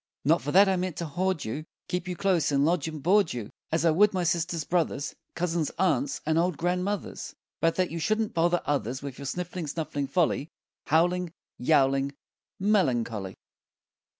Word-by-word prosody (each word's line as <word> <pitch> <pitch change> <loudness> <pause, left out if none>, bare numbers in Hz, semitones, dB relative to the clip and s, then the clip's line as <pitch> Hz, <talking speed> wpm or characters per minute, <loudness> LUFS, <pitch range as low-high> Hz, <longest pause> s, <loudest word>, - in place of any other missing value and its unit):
Not 165 +4 +4
for 145 - -3
that 195 +4 +7
I 190 -1 +2
mean 180 -1 -2
to 170 - -4
hoard 180 +2 -1
you, 125 +8 -4 0.2
Keep 180 0 -3
you 180 - -3
close 185 -5 +1
and 140 0 +3
lodge 165 -2 +1
and 155 -3 -6
board 195 +1 +4
you 115 -4 -6 0.2
As 160 +1 +1
I 165 - +5
would 200 +5 +4
my 180 - +1
sisters, 170 -1 0
brothers, 165 -4 -1 0.2
Cousins, 170 -3 0
aunts, 155 -7 +1
and 160 +1 +2
old 175 -2 +1
grandmothers, 180 +4 -2 0.2
But 165 0 +2
that 185 -1 0
you 165 - -3
shan't 215 +5 0
bother 170 +1 +2
others 135 -2 -1
With 140 -2 -7
your 140 - -5
sniffling, 175 +1 -4
snuffling 145 -2 -3
folly, 165 -2 +1 0.4
Howling, 175 +2 +2 0.3
Yowling, 135 0 +2 0.4
Melancholy. 120 - +1
165 Hz, 175 wpm, -27 LUFS, 145-180 Hz, 0.4 s, that